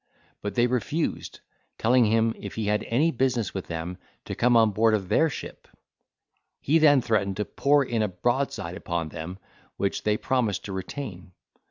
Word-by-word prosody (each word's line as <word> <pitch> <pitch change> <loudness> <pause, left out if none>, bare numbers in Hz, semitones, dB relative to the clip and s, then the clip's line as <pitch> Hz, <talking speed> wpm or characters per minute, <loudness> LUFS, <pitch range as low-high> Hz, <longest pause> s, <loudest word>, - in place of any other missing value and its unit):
but 105 - -4
they 120 -1 +4
refused, 130 +6 -2 0.4
telling 120 +1 +4
him, 115 +1 +2
if - - -8
he 110 - -2
had 105 +1 +1
any 145 +8 +2
business 125 - 0
with 95 - -5
them, 85 +2 -5 0.3
to - - -5
come 120 0 +3
on 110 -2 +5
board 110 +2 +3
of 95 -3 -4
their 160 - +3
ship: - - -8 0.9
he 160 +4 +3
then 145 -4 +6
threatened 100 -4 0
to 105 - -1
pour 140 0 +2
in 115 -2 -1
a 105 - +2
broadside 95 -2 -2
upon 85 -4 -3
them, 80 +4 -7 0.4
which 100 - -1
they 105 0 +1
promised 125 -6 -1
to 100 - -5
retain. 95 -2 -6
110 Hz, 175 wpm, -26 LUFS, 95-125 Hz, 0.9 s, then